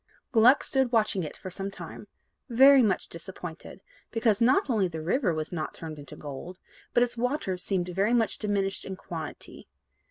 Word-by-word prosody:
Gluck 245 +3 +6
stood 265 -2 +1
watching 215 -5 +2
it 155 - -6
for 185 - -8
some 195 +2 -4
time, 195 - -9 0.4
very 265 +3 +7
much 210 -5 +1
disappointed, - - -9 0.3
because 225 -2 +1
not 260 - +4
only 215 -7 +2
the 165 -2 -6
river 185 - +1
was 155 -1 -3
not 160 -3 -4
turned 155 -2 -7
into 140 -2 -10
gold, 150 +5 -8 0.3
but 240 - +4
its 240 -1 -2
waters 235 -7 -1
seemed 180 -2 -2 0.2
much 225 -2 +1
diminished 200 -2 -1
in 190 - -6
quantity. 165 -4 -8
200 Hz, 165 wpm, -28 LUFS, 175-240 Hz, 0.4 s, very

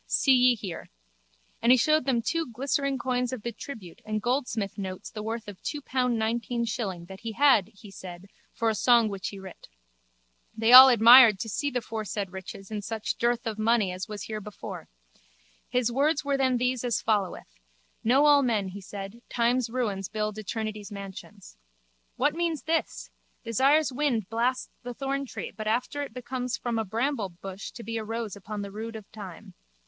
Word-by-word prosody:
See 270 - +3
ye 250 -1 +5
here. 195 -6 -7 0.7
And 235 - +4
he 255 - +7
showed 305 +3 +3
them 245 -4 +1 0.3
glistering 275 +2 0
coins 250 -1 -1
of 255 -5 -6
the 235 - -3
tribute 215 -7 -10
and 215 0 -2
goldsmith 235 -4 -2
notes 185 -1 -6
the 215 - -6
worth 225 +1 -4
of 205 -3 -10
two 295 - -3
pound 255 -3 0
nineteen 235 +2 -1
shilling 195 -6 -4
that 190 +2 -11
he 230 -1 -5
had, 255 -6 +4
he 210 -1 -15
said, 180 -1 -10 0.3
for 230 - -2
a 220 - +3
song 235 +1 +4
which 195 -2 -4
he 200 - -9
writ. 190 -1 -11 0.9
They 225 +2 +3
all 260 +1 +13
admired 235 -2 +8
to 225 - -4
see 285 +7 -1
the 250 -3 -2
foresaid 215 -3 -4
riches 190 +1 -9
in 210 -1 -3
such 220 +1 -3
dearth 240 +1 +1
of 220 -1 -3
money 215 -3 +2
as 185 +3 -5
was 210 -1 -6
herebefore. 210 -1 -7 0.8
His 245 -1 +1
words 295 +4 +1
were 280 -1 +1
then 260 -2 +2
these 250 0 0
as 240 -3 0
followeth: 190 - -2 0.4
Know 265 +6 +4
all 290 -1 +6
men, 220 -7 0
he 200 +2 -8
said, 200 +3 -8
time's 240 0 +1
ruins 210 -6 -2
build 215 -1 -3
eternity's 215 0 -5
mansions. 200 - -10 0.6
What 290 +3 +2
means 330 -5 -2
this? 325 +1 -2 0.3
Desire's 270 +5 +3
wind 245 -8 0
blasts 240 +3 -1
the 245 0 -7
thorntree 275 0 -4
but 215 -1 -5
after 250 +6 -1
it 285 - -5
becomes 250 0 -4
from 235 -2 -2
a 220 - -1
bramblebush 200 -5 -3
to 235 - -9
be 230 +2 -4
a 220 - -3
rose 225 -2 -4
upon 205 +1 -6
the 200 - -7
rood 225 +2 -6
of 215 -2 -9
time. 195 -6 -10
230 Hz, 180 wpm, -27 LUFS, 205-255 Hz, 0.9 s, all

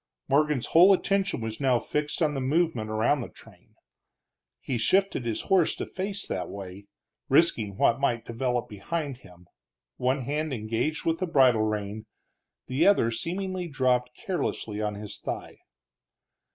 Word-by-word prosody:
Morgan's 145 -2 +2
whole 180 +4 +7
attention 195 -5 0
was 110 -1 -5
now 130 -3 +3
fixed 150 +6 -2
on 150 -1 +1
the 135 - -2
movement 140 -5 0
around 110 +6 +1
the - - -6
train. - - -19 0.8
He 125 -3 -3
shifted 185 - +2
his 110 - -1
horse 185 -4 +2
to - - -4
face 195 +1 -4
that - - -4
way, 100 0 -9 0.4
risking 120 - +3
what 115 +4 +3
might 120 -4 0
develop 125 +1 -2
behind 130 +7 -4
him, 90 -5 -17 0.5
one 130 +2 0
hand 150 +3 -2
engaged 115 +7 -2
with 165 0 +1
the 185 - -1
bridle 130 -8 +4
rein, 105 0 -3 0.6
the 130 +8 +2
other 195 - +4
seemingly 180 +8 -3
dropped 125 -4 0
carelessly 125 - -3
on 105 -1 -2
his 105 0 -7
thigh. - - -6
130 Hz, 150 wpm, -27 LUFS, 110-160 Hz, 0.8 s, whole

